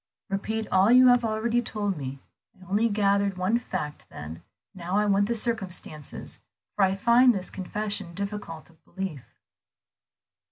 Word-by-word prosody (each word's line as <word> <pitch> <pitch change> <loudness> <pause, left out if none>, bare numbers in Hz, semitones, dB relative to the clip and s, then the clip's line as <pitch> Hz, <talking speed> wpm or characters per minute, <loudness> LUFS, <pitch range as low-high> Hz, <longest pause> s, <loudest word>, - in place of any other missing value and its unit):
"Repeat 220 +3 -2
all 190 +4 +4
you 255 0 +8
have 245 -1 +5
already 225 +2 0
told 205 -4 -2
me. 135 -2 -5 0.4
I 185 - -15
only 210 +5 +2
gathered 200 -2 +1
one 190 +6 +1
fact 150 -10 -5
then, 80 +3 -8 0.3
now 180 +1 -3
I 210 - +3
want 200 0 +3
the 235 - 0
circumstances, 195 - -4 0.4
for 205 - +2
I 190 0 +3
find 235 +4 +5
this 185 -1 -3
confession 200 -1 -3
difficult 200 -5 -6
of 160 - -29
belief." 185 -9 -7
200 Hz, 150 wpm, -26 LUFS, 185-220 Hz, 0.4 s, you